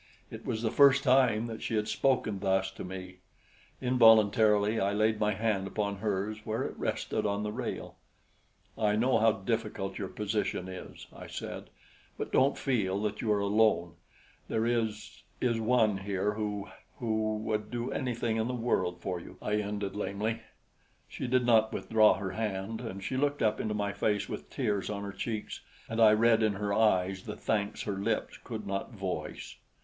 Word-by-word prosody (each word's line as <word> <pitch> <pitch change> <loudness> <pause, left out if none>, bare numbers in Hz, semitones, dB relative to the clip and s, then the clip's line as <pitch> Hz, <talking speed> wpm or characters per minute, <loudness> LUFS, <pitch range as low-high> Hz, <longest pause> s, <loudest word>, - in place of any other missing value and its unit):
It - - -9
was 110 +1 -2
the 110 - +1
first 140 +1 +6
time 125 -4 +4
that 115 -1 -6
she 115 - -2
had 105 0 0
spoken 125 -7 +1
thus 95 -1 +1
to - - -8
me. 90 0 -7 0.6
Involuntarily, 110 -3 +5
I 100 0 +1
laid 110 +1 +2
my 105 0 +2
hand 105 -3 0
upon 100 0 -2
hers 105 +1 -2
where 110 +1 -2
it - - -5
rested - - -2
on 100 0 -1
the 105 - -2
rail. - - -5 0.8
"I 105 -1 +1
know 125 +4 +3
how 115 0 +5
difficult 105 -1 -3
your 100 - -3
position 105 -2 -2
is," 95 -1 -9
I - - -9
said; - - -6 0.5
"but - - -4
don't 135 +2 +3
feel 100 -8 0
that 105 0 -2
you 110 - 0
are 105 - +3
alone. 100 -4 +2 0.5
There 110 0 0
is 115 -3 -2 0.2
is 115 -2 +1
one 110 -3 +2
here 100 +1 -1
who 105 -2 -3 0.3
who 110 -2 0
would 105 -1 -2
do 120 0 -3
anything 120 -3 -1
in 110 +1 0
the 125 - -2
world 90 -7 0
for 90 -1 -3
you," - - -12
I 105 0 -1
ended 100 -1 -3
lamely. 105 +2 -2 0.7
She - - -5
did 125 0 +2
not 110 -2 +4
withdraw 110 -1 +4
her 95 -1 -4
hand, 110 +1 -3
and 100 -5 -6
she 130 +7 -2
looked 145 0 +1
up 110 0 +2
into 105 -1 -2
my 100 -1 -1
face 105 +1 0
with - - -6
tears 105 -8 -1
on 100 -1 -3
her 100 - -4
cheeks 110 +2 -4 0.3
and 115 +1 -1
I 110 -1 +8
read 115 +1 +4
in 110 -1 +2
her 100 +1 -2
eyes 95 -3 +2
the 105 -2 -5
thanks 105 -1 -1
her 100 -2 -3
lips 100 - -2
could 110 -2 -6
not 100 +5 -3
voice. 95 -3 -5
105 Hz, 180 wpm, -30 LUFS, 100-115 Hz, 0.8 s, I